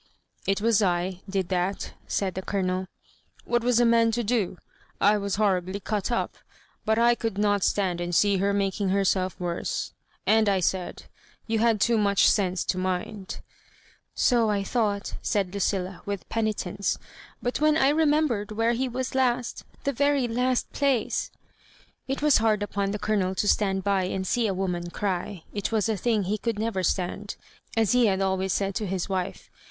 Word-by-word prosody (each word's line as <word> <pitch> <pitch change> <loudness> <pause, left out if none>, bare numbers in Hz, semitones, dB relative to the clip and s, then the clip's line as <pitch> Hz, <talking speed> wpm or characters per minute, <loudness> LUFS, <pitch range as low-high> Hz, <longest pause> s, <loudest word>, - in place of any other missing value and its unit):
" - - -24
It 195 - -1
was 225 -1 +3
I 180 -1 0
did 190 -2 -1
that," 185 +1 -1
said 190 -2 -1
the 190 - -4
ColoneL 185 -1 -1 0.3
" - - -31
What 240 -1 +1
was 245 -1 +3
a 240 - +5
man 230 0 +4
to 240 +1 0
do? 215 -5 0 0.4
I 205 +1 +5
was 200 -1 -2
horribly 195 -2 0
cut 210 +2 -2
up, 235 - -1 0.5
but 220 0 +2
I 235 +1 +5
could 225 -4 -3
not 205 -2 +2
stand 185 -4 +1
and 175 0 -2
see 200 +1 +4
her 200 +2 +1
making 200 0 0
herself 190 -1 +1
worse; 175 -1 -3 0.3
and 220 -1 +4
I 195 -1 +2
said, 185 0 -2 0.4
you 225 -1 0
had 225 -1 +3
too 230 +2 +3
much 200 -1 +4
sense 185 -3 +2
to 185 - -1
mind 185 +2 -3 0.4
" - - -29 0.2
''So 235 -3 +3
I 200 -1 0
ought," 205 -4 0
said 200 -4 0
Lucilla^ 190 -2 -2
with 200 -2 -4
penitence, 205 -3 -1 0.4
"but 245 +3 -2
when 305 0 +4
I 270 -3 +4
remembered 295 -8 +2
where 225 +2 +2
he 255 +2 -1
was 255 +1 -3
last^ 250 -2 0 0.2
the 280 - 0
very 285 -1 +2
last 250 +2 0
plac 280 -2 +3
e 230 - -4 0.6
" - - -31
It 275 - -2
was 300 -2 +6
hard 215 -2 +2
upon 200 -1 -1
the 205 - -2
Colonel 200 -3 0
to 205 - 0
stand 195 -2 +2
by 195 -1 +1
and 190 +1 -3
see 235 +3 +1
a 195 - 0
woman 180 -2 -2
cry. 185 -1 -3
It 205 +1 -2
was 220 -2 +1
a 220 - +1
thing 215 +1 +1
he 205 +3 -1
could 230 -1 -2
never 220 -3 -1
stand, 190 +3 -2 0.4
as 225 -3 +3
he 245 -2 +4
had 190 -2 +1
always 190 0 0
said 195 +2 0
to 210 +1 -2
his 185 -1 -2
wife. 190 -1 -4
205 Hz, 190 wpm, -26 LUFS, 190-230 Hz, 0.6 s, was